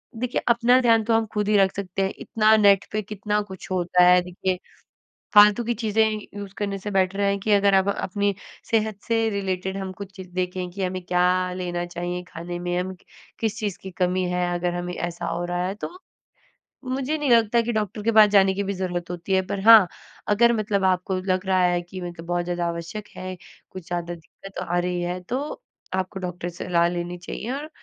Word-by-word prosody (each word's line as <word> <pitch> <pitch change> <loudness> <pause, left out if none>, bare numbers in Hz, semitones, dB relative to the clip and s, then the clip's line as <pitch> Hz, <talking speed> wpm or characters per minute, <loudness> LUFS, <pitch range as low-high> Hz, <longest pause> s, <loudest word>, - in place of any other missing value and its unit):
देखिए 245 +2 -2
अपना 240 +2 +5
ध्यान 230 -2 +4
तो 225 +1 +1
हम 225 - 0
खुद 210 -1 0
ही 210 - +4
रख 195 -1 +4
सकते 195 -1 -3
हैं 190 0 0
इतना 220 0 +3
नेट 200 -2 +5
पे 215 - -1
कितना 210 0 -2
कुछ 190 -3 -10
होता 180 0 +3
है 180 0 +6
देखिए। 180 +1 -3 0.7
फालतू 210 +2 +7
की 235 +1 0
चीज़ें 220 -1 +1 0.3
यूज़ 200 -1 -7
करने 200 -1 -2
से 205 +2 -5
बैटर 195 +1 +1
है 200 0 +2
कि 210 +2 -1
अगर 200 -1 +4
आप 190 +1 +3
अपनी 200 0 -1 0.4
सेहत 220 -2 0
से 230 -1 +2
रिलेटेड 190 -1 -2
हम 190 -1 -4
कुछ 195 0 -9
चीज़ 185 -2 -9
देखें 180 0 -2
कि 195 +1 -4
हमें 185 0 -2
क्या 180 0 +2 0.3
लेना 175 -1 -3
चाहिए 175 +1 -4
खाने 175 +1 -6
में, 175 0 -2
हम 185 +1 -4 0.4
किस 220 -2 -1
चीज़ 205 -4 -3
की 190 - -8
कमी 185 +1 0
है, 180 0 0
अगर 175 0 -1
हमें 175 0 -4
ऐसा 175 -1 -4
हो 175 - -2
रहा 175 0 -2
है 195 - -4
तो। - - -3 1.0
मुझे 270 +4 -1
नहीं 295 -3 -1
लगता 230 0 +4
कि 235 +1 -2
डॉक्टर 210 -1 -2
के 230 - +2
पास 215 -1 +7
जाने 195 -2 +5
की 200 +1 -2
भी 200 0 -2
जरूरत 180 -2 -3
होती 175 +2 -4
है 190 - +4
पर 195 - -3
हाँ, 220 -5 +10 0.4
अगर 235 +3 +4
मतलब 210 -3 0
आपको 185 0 +1
लग 185 0 -1
रहा 185 -1 +3
है 175 -1 +2
कि 185 +2 -9
मतलब 175 -1 -7
बहुत 175 0 -1
ज़्यादा 175 -1 -2
आवश्यक 170 +5 -5
है 185 0 -5 0.4
कुछ 185 -3 -9
ज़्यादा 175 0 -3
दिक्कत 195 +4 -14
आ 175 +1 0
रही 180 0 -1
है 175 +1 -2
तो 255 +3 -1 0.5
आपको 190 +1 -2
डॉक्टर 180 -1 -4
से 175 - -8
सलाह 170 -1 +3
लेनी 175 0 -4
चाहिए 215 +6 -6
और 295 +3 -5
190 Hz, 210 wpm, -24 LUFS, 180-210 Hz, 1.0 s, हाँ